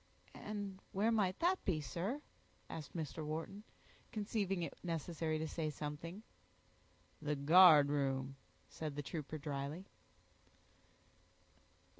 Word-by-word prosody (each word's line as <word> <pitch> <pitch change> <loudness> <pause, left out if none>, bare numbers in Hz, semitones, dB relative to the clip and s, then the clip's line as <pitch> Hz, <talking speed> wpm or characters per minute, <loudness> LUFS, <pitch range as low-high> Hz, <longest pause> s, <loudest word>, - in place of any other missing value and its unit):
"And 205 -2 -5
where 210 +4 +3
might 200 -4 +2
that 365 +2 +3
be, 170 -5 +1
sir?" 195 - -3 0.5
asked 155 +1 -7
Mr. 160 -1 -3
Wharton, 160 +6 -4 0.5
conceiving 205 -5 -1
it 165 - -4
necessary 165 -1 -1
to 160 +1 -2
say 155 -1 -2
something. 155 +7 -5 1.0
"The 150 0 0
guardroom," 140 -4 +6 0.3
said 155 -3 -5
the 145 - -3
trooper, 155 +1 -4
dryly. 145 +4 -4
160 Hz, 105 wpm, -37 LUFS, 150-195 Hz, 1.0 s, guardroom